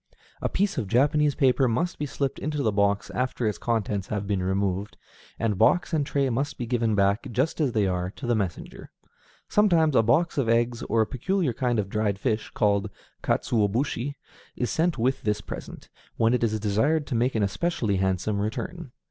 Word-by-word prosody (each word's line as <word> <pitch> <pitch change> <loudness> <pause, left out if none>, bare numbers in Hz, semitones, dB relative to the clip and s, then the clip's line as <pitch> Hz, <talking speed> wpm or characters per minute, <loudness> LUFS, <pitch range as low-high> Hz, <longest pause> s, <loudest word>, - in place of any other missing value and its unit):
A - - 0
piece 200 -5 0
of 110 - -3
Japanese 145 +6 +3
paper 130 -2 +3
must 165 +10 -1
be 145 - -2
slipped 140 0 -2
into 150 0 -2
the 110 - +2
box 100 0 +1
after 125 -1 -2
its 105 -5 -2
contents 105 -4 -1
have 105 -2 -3
been 100 -2 -1
removed, 95 +1 -1 0.4
and 105 -4 -1
box 145 +11 +3
and 155 -2 +2
tray 140 -1 0
must 135 +5 -2
be 120 - -3
given 115 -2 0
back, 100 +1 +2
just 135 +7 0
as 135 -6 +1
they 105 -2 +2
are, 90 -1 -1
to 140 - -7
the 120 - +2
messenger. 100 -6 -4 0.6
Sometimes 170 -8 +3
a - - +6
box 145 +8 +2
of 120 -4 0
eggs, 120 +1 +1
or 115 +1 +1
a - - +3
peculiar 145 - -1
kind 120 0 0
of 105 -2 0
dried 105 -1 -1
fish, 110 0 -1
called 100 -1 +1 0.3
katsuobushi, 120 +5 0 0.4
is 125 - -2
sent 165 -2 +1
with 125 +3 0
this 105 -1 0
present, - - -8 0.3
when 115 +1 +3
it 125 - +1
is 110 -1 +1
desired 110 +10 +1
to 145 - -5
make 120 +2 +1
an 110 - +2
especially 105 - 0
handsome 95 +2 0
return. 125 - -4
115 Hz, 190 wpm, -26 LUFS, 105-140 Hz, 0.6 s, a